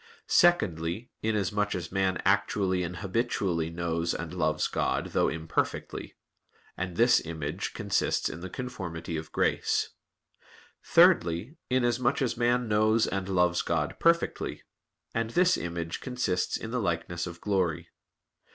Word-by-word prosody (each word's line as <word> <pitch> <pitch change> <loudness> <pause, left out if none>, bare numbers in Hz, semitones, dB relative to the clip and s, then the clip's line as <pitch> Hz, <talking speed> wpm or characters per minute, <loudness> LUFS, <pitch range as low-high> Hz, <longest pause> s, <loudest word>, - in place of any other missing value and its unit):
Secondly, 100 - +2
inasmuch 105 -1 0
as 85 -2 -5
man 95 -2 +1
actually 95 -3 +2
and 90 0 -4
habitually 95 -6 0
knows 85 0 -1
and - - -5
loves - - +1
God, - - -1
though - - +3
imperfectly; 80 0 -3 0.6
and 90 -1 -4
this 120 0 +5
image 80 -3 -4
consists - - 0
in 80 - -6
the 95 +2 -6
conformity 90 -10 -5
of 80 0 -5
grace. - - +1 0.9
Thirdly, 85 - +4
inasmuch 125 0 +2
as 125 - 0
man 120 0 +1
knows 110 +1 +3
and 95 0 -3
loves 90 -2 +2
God 75 -2 -1
perfectly; 170 0 +1 0.5
and 115 -1 -1
this 180 +8 +4
image 85 -1 -4
consists 125 -8 -1
in 110 - -7
the 125 - 0
likeness 85 -1 -2
of 85 0 -8
glory. 95 -6 -1
95 Hz, 130 wpm, -28 LUFS, 85-115 Hz, 0.9 s, this